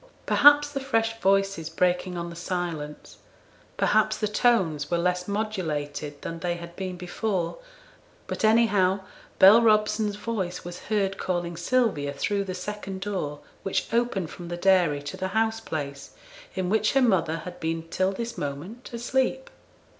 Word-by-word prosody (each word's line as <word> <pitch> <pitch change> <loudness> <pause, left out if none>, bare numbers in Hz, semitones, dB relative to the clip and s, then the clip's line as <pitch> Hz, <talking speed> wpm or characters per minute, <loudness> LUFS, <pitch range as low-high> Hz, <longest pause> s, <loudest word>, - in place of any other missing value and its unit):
Perhaps 290 0 +6
the 280 - -2
fresh 225 -4 0
voices 195 -4 +2
breaking 180 +2 0
on 170 0 -4
the - - -9
silence, 170 -4 -4 0.6
perhaps - - +3
the 215 - 0
tones 190 - +2
were 175 - +1
less 180 +1 0
modulated 155 -9 -3
than 165 0 -5
they 175 0 -1
had 170 0 -9
been 185 -1 -5
before, 180 - -2 0.7
but - - -5
anyhow 205 -4 +4 0.4
Bell 205 +5 +8
Robson's 215 -1 +3
voice 195 -6 -4
was 175 0 -7
heard 195 -2 0
calling 175 -2 -2
Sylvia 175 - +1
through 200 +8 -1
the 185 -1 -4
second 195 0 -6
door, 180 -8 -3 0.2
which 195 - -2
opened 230 -8 0
from 175 - -9
the 175 0 -4
dairy 175 -6 +3
to 145 - -6
the 190 - -2
house 225 0 +1
place, 145 -9 -6 0.4
in 185 -1 -1
which 215 +2 +2
her 270 - +4
mother 165 -8 +2
had 180 -1 -8
been 165 0 -3
till 185 +2 +1
this 235 +4 -5
moment 150 - -6
asleep. 260 - -1
190 Hz, 155 wpm, -26 LUFS, 170-220 Hz, 0.7 s, Bell